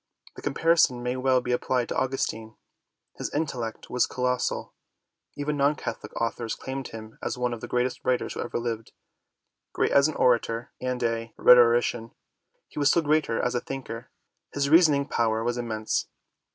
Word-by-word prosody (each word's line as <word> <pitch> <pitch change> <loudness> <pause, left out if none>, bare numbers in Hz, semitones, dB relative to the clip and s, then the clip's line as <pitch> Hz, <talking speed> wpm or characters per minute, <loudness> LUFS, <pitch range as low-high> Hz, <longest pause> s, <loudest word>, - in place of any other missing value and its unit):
The - - -10
com 140 -2 -3
parison 165 -7 +3
may 125 +1 -1
well 130 0 +2
be 125 - -3
applied 125 0 0
to - - -3
Augustine. 115 -4 -2 0.6
His - - -3
intellect 125 -7 -3
was 125 -1 +2
colossal. 125 0 -1 0.6
Even 145 +1 -2
non 140 +2 +3
Catholic - - -6
authors 115 0 -2
claim 135 0 -5
him 110 -2 -10
as - - -3
one 125 -1 -1
of 115 - -7
the - - -6
greatest 125 +1 -1
writers 125 -1 0
who - - -7
ever - - -3
lived. 115 -2 -4 0.8
Great - - +1
as 140 +1 +5
an 155 - -4
orator 115 -1 +1
and 125 -1 -2
a 115 0 -2
rhetorician, 120 -1 +5 0.5
he - - -8
was 145 -1 +4
still 170 +2 +3
greater 150 -5 +1
as 125 - 0
a 120 - 0
thinker. 130 -3 -7 0.4
His 140 0 -1
reasoning 155 -4 +5
power 110 -1 0
was 120 +1 -1
immense. 110 -2 -2
125 Hz, 170 wpm, -26 LUFS, 115-135 Hz, 0.8 s, as